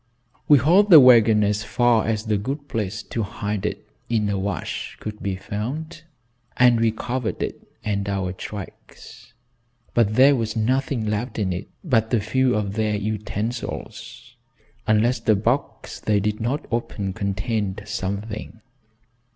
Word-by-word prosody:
We 145 - +7
hauled 180 - +4
the 165 -5 +11
wagon 115 -5 +6
as 105 +1 0
far 115 +1 +2
as 110 0 -1
a 110 - +2
good 135 +8 -4
place 110 -3 -3
to 115 - -4
hide 105 -1 -3
it, - - -6 0.2
in 110 -3 +1
a 100 - -1
wash, 100 +2 -4
could 105 0 -7
be 100 -1 -2
found, 135 - -5 0.6
and 125 -2 +5
we 115 0 +3
covered 120 +2 -3
it - - -5 0.2
and 100 -1 -2
our 95 -2 -2
tracks. 120 +5 -10 0.6
But 110 -3 +2
there 135 +3 +6
was 115 -3 -2
nothing 125 +1 0
left 110 +3 -2
in 95 -4 0
it 90 - -6 0.2
but 115 - +1
a - - +2
few 125 +5 +1
of 100 -2 -1
their 105 0 0
utensils, 105 +2 -5 0.5
unless 110 +3 +3
the 110 -1 +3
box 120 +7 -2
they 105 -1 +1
did 105 +1 -1
not 125 +6 -1
open 105 -4 -2
contained 100 0 -2
something. 105 +2 -5
110 Hz, 150 wpm, -23 LUFS, 105-120 Hz, 0.6 s, the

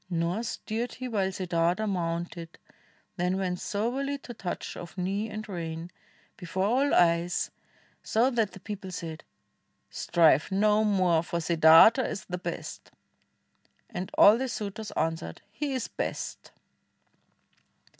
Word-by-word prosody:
Nor 170 +4 -1
stirred 235 0 -4
he 255 0 -5
while 200 -5 0
Siddartha 180 +2 0
mounted, 170 -2 -3 0.6
then 180 +1 0
Went 180 -2 -2
soberly 260 +7 -2
to 255 -3 -10
touch 190 -5 -5
of 175 +2 -9
knee 195 +4 -1
and 215 0 -6
rein 165 -2 -5 0.5
Before 185 +1 -2
all 265 +7 +2
eyes, 170 0 +2 0.5
so 240 +4 +2
that 225 -5 0
the - - -10
people 195 -1 -7
said, 165 -3 -6 0.7
"Strive 165 -2 +3
no 210 +2 +3
more, 185 -6 +3
for 170 0 -3
Siddartha 165 +8 +7
is 215 - -4
the 180 -1 -5
best." - - -6 1.0
And 180 +1 -4
all 210 +3 +8
the 265 0 -2
suitors 215 -1 -5
answered 160 +1 -3
"He 285 +6 -3
is 255 -3 -2
best!" - - -5
190 Hz, 130 wpm, -28 LUFS, 170-220 Hz, 1.0 s, all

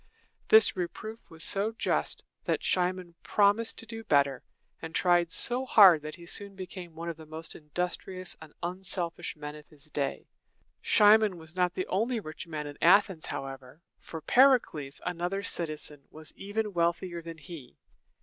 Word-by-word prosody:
This 440 0 +6
reproof 215 +5 -6
was 160 -1 -4
so 205 +6 +2
just, 225 - -1 0.2
that - - -1
Cimon 180 -1 0
promised 210 +2 +2
to - - -7
do 225 0 -7
better, 140 -6 +2 0.4
and 160 0 -7
tried 175 -2 +3
so 245 +8 +3
hard 195 -10 +7
that 155 +1 -7
he 170 -1 -13
soon 200 +3 -2
became 185 -3 -8
one 170 +1 -6
of 170 -2 -4
the 160 -1 -12
most 160 +1 -4
industrious 180 +3 -4
and 160 -1 -12
unselfish 175 -1 -3
men 150 -1 -7
of 150 -1 -13
his 150 0 -16
day. 140 -2 -2 0.6
Cimon 210 -2 +5
was 160 +1 -10
not 180 -1 +1
the 185 - -2
only 225 +5 0
rich 155 -4 -8
man 155 -2 -5
in 145 -1 -9
Athens, 185 -2 +4
however; 135 +1 -7 0.2
for 160 -2 -9
Per´i 265 +1 +6
cles, 145 -9 -6
another 180 +3 -2
citizen, 155 -5 -2
was 155 0 -6
even 210 +1 -3
wealthier 170 0 -1
than 165 0 -9
he. 150 -4 -11
175 Hz, 165 wpm, -29 LUFS, 155-195 Hz, 0.6 s, hard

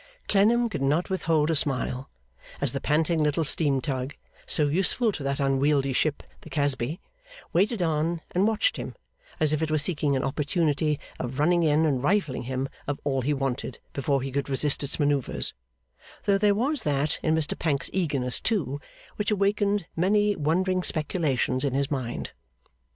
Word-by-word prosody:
Clennam 230 +4 +4
could 215 - -4
not 150 +7 +1
withhold 165 -4 +1
a - - +1
smile, 135 -2 -1 0.5
as - - +1
the - - -3
panting 160 +2 +1
little 150 +2 +1
steam 145 -2 +3
tug, 130 0 -3 0.3
so 150 - +3
useful 195 - +2
to 175 - -7
that 140 0 -2
unwieldy 135 0 +2
ship, 145 +3 0 0.2
the - - -12
Casby, 145 +1 0 0.5
waited 195 +3 +2
on 165 +1 0
and 190 +4 +2
watched 225 - +1
him - - -6 0.4
as 155 -1 +3
if 155 - 0
it 160 - 0
were 155 - +2
seeking 150 -2 0
an 130 - 0
opportunity 150 +1 0 0.2
of 125 +1 -4
running 170 +4 +3
in 155 0 +3
and 135 -5 +1
rifling 160 -3 +1
him 130 +1 -2 0.2
of 145 0 -2
all 135 -2 0
he 140 +4 0
wanted 135 -3 -2 0.2
before 140 -1 0
he 135 - -4
could 140 +1 -2
resist 140 +1 +2
its 140 - -3
manoeuvres; 145 -3 +1 0.7
though 200 -1 +3
there 205 0 +3
was 265 +5 0
that 145 -2 0
in 160 0 +2
Mr 155 -2 0
Pancks's 145 -4 -1
eagerness, 140 -9 -1
too, 145 - -1 0.4
which 210 - -1
awakened 205 -1 +1
many 205 +4 +2
wondering 185 +5 +1
speculations 150 -6 0
in 135 -2 0
his 140 +2 0
mind. 130 -4 -3
150 Hz, 170 wpm, -26 LUFS, 140-180 Hz, 0.7 s, Clennam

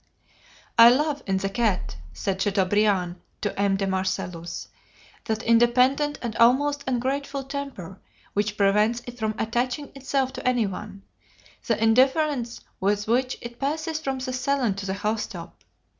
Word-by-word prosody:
"I 230 +1 +11
love 290 +3 +1
in 190 -1 +1
the 195 +1 -1
cat," 205 - 0 0.2
said 190 - -3
Chateaubriand 195 -2 +1 0.2
to 205 - -2
M. 200 -1 +3
de 195 - -1
Marcellus, 180 -3 -3 0.6
"that 220 +1 -2
independent 250 +5 +3
and 230 -2 -3
almost 280 +5 +3
ungrateful 270 +2 -1
temper 270 - -6 0.3
which 205 +1 -1
prevents 210 +4 +2
it 245 0 -9
from 215 -1 -1
attaching 245 +5 -2
itself 270 -1 -1
to - - -4
any 245 -3 +3
one: 195 0 -7 0.6
the 230 - +2
indifference 255 +2 +2 0.2
with 205 +1 0
which 255 +3 +1
it 235 0 -9
passes 310 +3 -2
from 270 -4 -2
the 255 0 -4
salon 255 -3 +1
to 195 0 -6
the 190 - -1
house 215 +2 -1
top. - - -10
235 Hz, 145 wpm, -25 LUFS, 200-265 Hz, 0.6 s, I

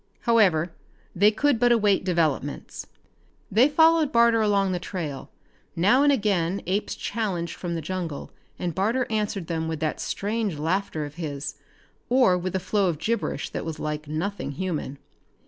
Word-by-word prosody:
However, 185 -8 +3 0.4
they 205 +4 +6
could 240 +3 +1
but 245 0 +4
await 210 -5 +3
developments. 160 -6 -1 0.6
They 240 +8 +5
followed 320 0 +4
Barter 235 -2 +4
along 200 -2 +2
the 180 - -1
trail. 165 -7 -5 0.5
Now 205 +10 +4
and 290 0 +5
again 200 -7 0
apes 195 +4 -1
challenged 195 -7 -3
from 175 -2 -4
the 165 - -4
jungle, 170 -3 -4 0.3
and 175 -2 -3
Barter 225 +8 +1
answered 210 -4 -1
them 160 -1 -2
with 160 -1 -3
that 155 -1 -1
strange 210 -4 -2
laughter 160 0 -1
of 145 +2 -10
his, 145 -2 -4 0.6
or 250 -7 +4
with 180 +1 -3
a - - +1
flow 195 +2 +1
of 165 - -2
gibberish 225 +8 -2
that - - -4
was 160 -1 -5
like 150 0 -4
nothing 160 0 -3
human. 155 -4 -3
185 Hz, 160 wpm, -25 LUFS, 160-220 Hz, 0.6 s, they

